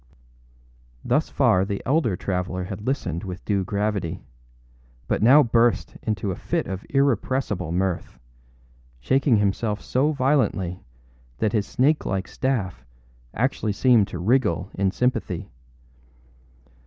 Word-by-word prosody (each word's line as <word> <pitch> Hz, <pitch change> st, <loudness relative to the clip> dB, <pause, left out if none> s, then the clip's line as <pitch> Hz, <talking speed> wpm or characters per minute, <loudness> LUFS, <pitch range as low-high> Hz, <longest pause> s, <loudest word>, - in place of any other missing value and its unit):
â -, -, -31 dB, 1.0 s
Thus -, -, +1 dB
far 90 Hz, 0 st, +3 dB
the 100 Hz, 0 st, -3 dB
elder 130 Hz, -, +2 dB
traveller 90 Hz, 0 st, -3 dB
had 100 Hz, +4 st, -7 dB
listened 90 Hz, -, -2 dB
with 90 Hz, -2 st, -7 dB
due 100 Hz, -2 st, +1 dB
gravity; 100 Hz, -3 st, -2 dB, 0.8 s
but -, -, 0 dB
now 135 Hz, +7 st, +7 dB
burst 115 Hz, -1 st, +2 dB
into 105 Hz, -3 st, -2 dB
a -, -, -3 dB
fit -, -, -2 dB
of 95 Hz, 0 st, -5 dB
irrepressible 130 Hz, -, 0 dB
mirth, 90 Hz, 0 st, -2 dB, 0.8 s
shaking 130 Hz, -, +2 dB
himself 105 Hz, +1 st, 0 dB
so 140 Hz, +4 st, +1 dB
violently 130 Hz, -, 0 dB, 0.6 s
that 105 Hz, -, 0 dB
his 105 Hz, -3 st, 0 dB
snake 145 Hz, +4 st, +2 dB
like 95 Hz, -1 st, -2 dB
staff 100 Hz, -, -2 dB, 0.5 s
actually 115 Hz, -4 st, 0 dB
seemed 115 Hz, -2 st, +4 dB
to -, -, -6 dB
wriggle 95 Hz, -3 st, +1 dB
in 95 Hz, 0 st, +1 dB
sympathy. 125 Hz, +6 st, -2 dB
105 Hz, 125 wpm, -24 LUFS, 95-130 Hz, 1.0 s, now